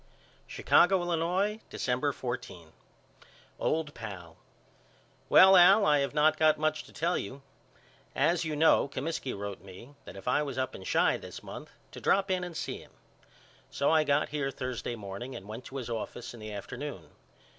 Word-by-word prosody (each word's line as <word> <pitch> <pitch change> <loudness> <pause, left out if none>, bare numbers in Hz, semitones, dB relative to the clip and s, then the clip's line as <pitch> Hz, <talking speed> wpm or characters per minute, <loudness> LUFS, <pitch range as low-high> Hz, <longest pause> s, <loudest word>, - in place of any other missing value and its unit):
Chicago, 190 +2 +4
Illinois, 175 +5 0
December 130 +3 -1
14. 105 - -6 0.9
OLD 155 -2 -1
PAL: 90 -7 -9 0.9
Well 190 +1 +8
Al 190 +4 +7
I 150 -1 +4
have 140 +2 -2
not 155 +1 +4
got 155 -1 +4
much 155 0 -1
to - - -16
tell 170 +4 0
you. 135 +7 -8 0.7
As 170 0 +2
you 155 -2 -3
know 160 -1 +4
Comiskey 140 0 -4
wrote 100 -1 -6
me 100 +8 -13
that 90 - -10
if 95 - -11
I 135 +4 +2
was 140 -3 -4
up 130 0 -2
in 95 - -10
Chi - - +2
this - - -10
month - - -9 0.2
to - - -10
drop 195 0 +2
in 185 -1 0
and 175 -2 -6
see - - -4
him. - - -17 0.8
So 140 - +1
I 160 -1 +4
got 145 0 +1
here 145 -2 -2
Thursday 125 -3 -4
morning 105 +5 -7
and 100 - -9
went 110 +4 -8
to 135 - -10
his 125 - -5
office 120 +1 -5
in 120 - -11
the 110 0 -7
afternoon. 100 -2 -7
140 Hz, 175 wpm, -29 LUFS, 120-160 Hz, 0.9 s, Well